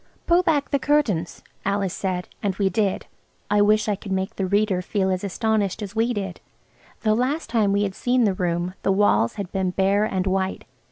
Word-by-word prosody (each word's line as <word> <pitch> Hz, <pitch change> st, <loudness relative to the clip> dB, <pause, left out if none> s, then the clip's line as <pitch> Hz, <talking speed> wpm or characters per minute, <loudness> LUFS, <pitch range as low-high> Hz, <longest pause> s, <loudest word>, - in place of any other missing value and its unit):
"Pull 345 Hz, +1 st, +4 dB
back 295 Hz, -5 st, 0 dB
the 280 Hz, -, +2 dB
curtains," 245 Hz, -, 0 dB, 0.2 s
Alice 195 Hz, -2 st, 0 dB
said, 185 Hz, -2 st, -3 dB
and 200 Hz, -4 st, -1 dB
we 195 Hz, -1 st, +1 dB
did. 195 Hz, 0 st, 0 dB, 0.5 s
I 205 Hz, 0 st, +4 dB
wish 215 Hz, +1 st, +3 dB
I 210 Hz, -, +1 dB
could 195 Hz, 0 st, -9 dB
make 190 Hz, +3 st, -2 dB
the 190 Hz, -, -1 dB
reader 200 Hz, -1 st, +1 dB
feel 190 Hz, 0 st, 0 dB
as 185 Hz, +1 st, -2 dB
astonished 210 Hz, 0 st, -1 dB
as 200 Hz, +1 st, -7 dB
we 230 Hz, +2 st, +2 dB
did. 195 Hz, -5 st, -4 dB, 0.6 s
The 215 Hz, -1 st, +2 dB
last 255 Hz, +6 st, -1 dB
time 215 Hz, -4 st, +2 dB
we 200 Hz, +1 st, +2 dB
had 195 Hz, -2 st, -2 dB
seen 245 Hz, +4 st, +1 dB
the 205 Hz, -3 st, +3 dB
room 175 Hz, 0 st, -1 dB
the -, -, +1 dB
walls 195 Hz, -, +3 dB
had 200 Hz, -4 st, -5 dB
been 190 Hz, -2 st, 0 dB
bare 195 Hz, +3 st, +2 dB
and 190 Hz, -3 st, -1 dB
white. 190 Hz, 0 st, -1 dB
200 Hz, 205 wpm, -23 LUFS, 190-220 Hz, 0.6 s, Pull